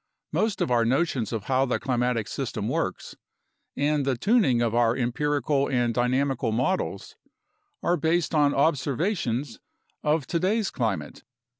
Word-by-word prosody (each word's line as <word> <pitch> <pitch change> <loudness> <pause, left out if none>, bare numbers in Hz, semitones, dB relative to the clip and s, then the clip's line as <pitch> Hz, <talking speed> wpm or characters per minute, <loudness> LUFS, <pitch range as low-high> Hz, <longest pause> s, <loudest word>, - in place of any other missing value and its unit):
Most 215 -2 0
of - - 0
our 120 -1 +3
notions 130 -2 0
of 110 -4 -3
how 130 +3 +1
the 125 - -1
climatic 125 -4 0
system - - -4
works, - - -3 0.6
and 145 +1 +1
the 135 -2 0
tuning 195 - +3
of 115 -2 0
our 120 0 +3
empirical 140 +2 0
and 120 -3 +1
dynamical 125 0 0
models, 125 - -2 0.7
are 175 - +2
based 165 +2 0
on 145 -2 +4
observations 140 - 0 0.4
of 150 -1 +1
today's 195 +7 0
climate. 100 - -3
135 Hz, 135 wpm, -26 LUFS, 120-150 Hz, 0.7 s, on